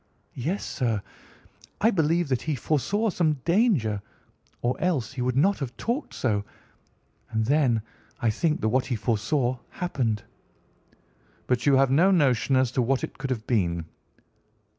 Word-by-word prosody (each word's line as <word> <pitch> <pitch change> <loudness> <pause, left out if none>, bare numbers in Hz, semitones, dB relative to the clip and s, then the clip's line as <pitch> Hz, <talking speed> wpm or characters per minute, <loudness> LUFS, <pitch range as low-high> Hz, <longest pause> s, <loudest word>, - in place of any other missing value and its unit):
"Yes, 165 +11 -2
sir. 115 -5 -1 0.8
I 225 - +4
believe 165 -2 +2
that 130 -2 0
he 155 -2 -1
foresaw 160 - 0
some 165 -4 +2
danger, 170 - +2 0.6
or 120 +1 +1
else 155 -8 0
he 130 - -4
would 125 +1 0
not 195 +8 +3
have 130 -3 -5
talked 245 +6 -3
so. 105 -5 0 0.9
And 110 -1 0
then 130 -5 +2 0.4
I 115 - +2
think 155 +7 0
that 110 - +1
what 130 +2 +1
he 125 - -1
foresaw 120 +3 0
happened." 125 - -2 1.2
"But 125 +1 0
you 140 - +6
have 135 0 +4
no 170 +8 +5
notion 135 - +3
as 130 -2 +3
to 130 - +1
what 130 +2 +1
it - - -6
could 135 0 -3
have 115 -4 -3
been?" 85 -8 0
130 Hz, 155 wpm, -26 LUFS, 120-160 Hz, 1.2 s, you